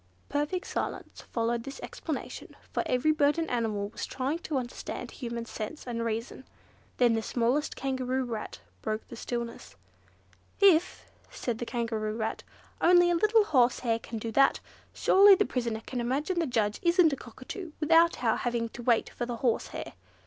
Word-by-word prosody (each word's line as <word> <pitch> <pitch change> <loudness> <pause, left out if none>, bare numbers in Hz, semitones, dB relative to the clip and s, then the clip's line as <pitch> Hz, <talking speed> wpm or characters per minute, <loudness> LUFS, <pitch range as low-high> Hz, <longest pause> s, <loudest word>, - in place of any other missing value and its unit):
Perfect 295 +6 -1
silence - - -4
followed 230 0 0
this 275 +2 -8
explanation, - - -6 0.2
for - - 0
every 255 +5 +2
bird 295 0 +3
and 330 -1 -1
animal 215 -4 -1
was - - -5
trying 270 +5 -2
to 310 -4 -3
understand 245 -1 -5
human 235 -3 -5
sense 230 +7 -6
and 235 -2 -3
reason. 230 +3 -3 0.5
Then 240 -2 +4
the 225 - +1
smallest 245 +6 0
Kangaroo 260 -1 -1
Rat 220 - -6 0.2
broke 215 0 -3
the - - -8
stillness. 235 0 -5 0.8
"If," 365 -4 +4 0.2
said 235 -3 -4
the 240 - -4
Kangaroo 225 -3 -2
Rat, 220 -1 -2 0.4
"only 350 0 +6
a - - +3
little 430 +5 +4
horsehair 245 - +2
can 230 - -7
do 225 +1 -4
that, 275 +4 +4 0.3
surely 395 +1 +7
the 410 +2 +2
prisoner 235 -3 -2
can 250 -2 -3
imagine 290 +9 -1
the 330 - +1
judge 215 -4 0
isn't 340 -3 +4
a - - +1
cockatoo, 275 - -9
without 330 -2 +4
our 225 -2 +3
having 235 -1 -1
to 240 - -9
wait 235 -1 +2
for 240 - -4
the 240 - -3
horsehair. 235 0 -2
250 Hz, 165 wpm, -29 LUFS, 230-310 Hz, 0.8 s, surely